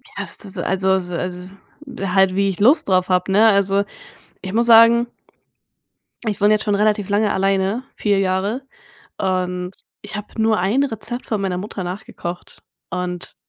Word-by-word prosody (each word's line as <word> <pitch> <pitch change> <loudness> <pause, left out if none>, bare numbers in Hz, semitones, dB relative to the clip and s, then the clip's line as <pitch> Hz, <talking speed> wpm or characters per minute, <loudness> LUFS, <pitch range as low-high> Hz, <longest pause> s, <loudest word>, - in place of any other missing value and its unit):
Ja, - - -3
ist - - -5
das, 195 0 -7
also, 190 +1 +1
so 180 -1 -6
s 180 +1 -4 0.6
halt 190 -1 +2
wie 200 0 +2
ich 190 - -5
Lust 280 +10 +4
drauf 185 0 +2
habe, 180 +1 +1
ne? 210 +3 +5
Also, 200 -1 +2 0.6
ich 190 - -6
muss 235 +2 +2
sagen, 230 +1 +7 1.2
ich 210 -3 -2
wohne 205 +1 +5
jetzt 215 - -1
schon 210 - +1
relativ 210 -1 +1
lange 210 +1 +1
alleine, 195 +5 0
4 205 -2 +1
Jahre, 195 +6 -1 0.6
und 180 -1 -2 0.3
ich - - -7
habe 210 +2 -7
nur 220 -1 +3
1 205 +10 +2
Rezept 240 -1 -5
von 215 -3 -2
meiner 190 -2 -2
Mutter 195 0 -6
nachgekocht 180 -1 -7 0.3
und 180 0 -5
195 Hz, 165 wpm, -20 LUFS, 185-215 Hz, 1.2 s, sagen